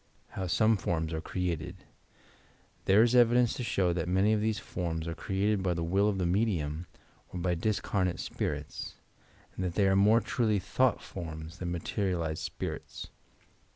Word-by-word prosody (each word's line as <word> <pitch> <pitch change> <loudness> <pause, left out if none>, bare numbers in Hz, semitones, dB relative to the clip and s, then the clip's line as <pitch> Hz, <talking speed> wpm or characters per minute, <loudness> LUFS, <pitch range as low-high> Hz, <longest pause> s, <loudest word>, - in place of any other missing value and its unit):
HOW 95 -1 -4
SOME 110 +4 +3
FORMS 80 -3 -2
ARE 80 - -2
CREATED 90 0 -3 1.1
There 100 +3 +6
is 120 0 +2
evidence 120 -1 +5
to 125 - -4
show 95 -6 +1
that 85 0 -2
many 95 +4 +3
of 105 - +1
these 110 0 0
forms 85 -2 -4
are 85 - -2
created 100 +4 0
by 90 -2 0
the 85 - -2
will 95 +5 +2
of 100 - -1
the 90 - 0
medium 85 -5 0 0.4
or 90 - -5
by 90 0 +1
dlscarnate 95 0 0
spirits, - - -4 0.6
and 95 - -3
that 90 -2 -2
they 100 0 +3
are 95 - +4
more 105 +4 +5
truly 110 -3 +1
thought 125 +5 +1
forms 80 -2 -7
than 90 -1 -3
materialized 85 -2 -2
spirits. - - -6
95 Hz, 165 wpm, -30 LUFS, 85-105 Hz, 1.1 s, There